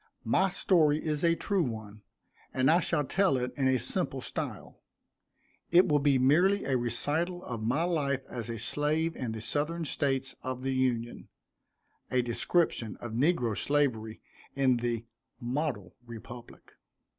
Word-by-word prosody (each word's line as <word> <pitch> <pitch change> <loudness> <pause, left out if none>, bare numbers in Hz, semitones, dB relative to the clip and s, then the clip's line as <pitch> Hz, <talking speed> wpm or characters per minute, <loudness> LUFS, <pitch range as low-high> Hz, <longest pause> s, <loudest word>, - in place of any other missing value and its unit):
My 190 +12 +3
story 165 -5 +3
is 155 0 -2
a 170 0 +4
true 195 +2 0
one, 110 -6 -5 0.5
and 130 +3 +4
I 170 - +5
shall 150 -4 0
tell 185 0 +2
it 125 0 -3
in 135 -2 +1
a 130 0 +3
simple - - -2
style. - - -6 0.9
It 180 +2 +6
will 150 -3 +3
be 140 -1 +3
merely 175 +10 +3
a 135 - +1
recital 145 +9 -1
of 120 -3 -5
my 125 +9 +1
life 145 -6 0
as 120 -2 -6
a 115 - -4
slave 155 +7 0
in 125 -4 -4
the 110 -1 -5
Southern 160 +7 -1
States 135 -3 0
of 130 0 -5
the 135 0 -1
Union 120 -3 -1 0.8
a 125 -1 +1
description 120 - 0
of 120 - -6
negro 125 -2 +1
slavery 120 -7 0 0.3
in 130 -2 +3
the 120 -1 -2 0.3
"model 120 - -3
Republic." 120 +1 -11
135 Hz, 150 wpm, -29 LUFS, 120-155 Hz, 0.9 s, It